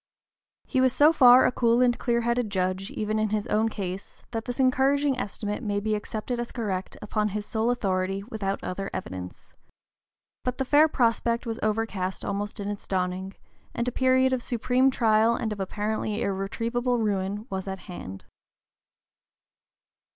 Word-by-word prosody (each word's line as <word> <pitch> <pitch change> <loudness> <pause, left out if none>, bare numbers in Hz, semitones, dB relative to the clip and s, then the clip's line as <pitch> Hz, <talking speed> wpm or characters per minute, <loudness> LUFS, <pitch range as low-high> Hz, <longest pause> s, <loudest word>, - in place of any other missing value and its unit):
He 260 - +1
was 260 -1 +3
so 300 +2 +6
far 255 -4 +8
a - - +3
cool 235 -1 +2
and 245 -1 +4
clear 235 -1 0
headed 235 -1 0
judge, 185 0 -1
even 215 0 -2
in 215 0 +1
his 210 0 -1
own 220 +1 +2
case, 195 -3 -6
that 225 -1 -3
this 245 +1 -5
encouraging 270 +2 +3
estimate 210 +1 -4
may 205 -3 -1
be 215 +1 -1
accepted 215 +3 -3
as 240 - -3
correct 195 -6 -3
upon 210 0 0
his 210 0 -3
sole 220 +2 0
authority 195 -4 -1
without 200 -3 -3
other 195 +2 -4
evidence. 90 - -7 0.9
But 250 0 -2
the 265 - -1
fair 295 +4 +6
prospect 235 -3 +1
was 225 0 -4
overcast 210 -4 -2
almost 205 +2 -3
in 200 - -4
its 205 -1 -5
dawning, 185 +1 -2 0.4
and 235 +1 -1
a - - +1
period 260 +1 +3
of 255 - 0
supreme 250 +2 +2
trial 225 -2 +3
and 220 -3 -2
of 205 - -9
apparently 210 +2 -2
irretrievable 230 +6 -1
ruin 205 -1 -1
was 190 0 -3
at 190 0 -3
hand. 95 - -8
215 Hz, 165 wpm, -26 LUFS, 195-245 Hz, 0.9 s, far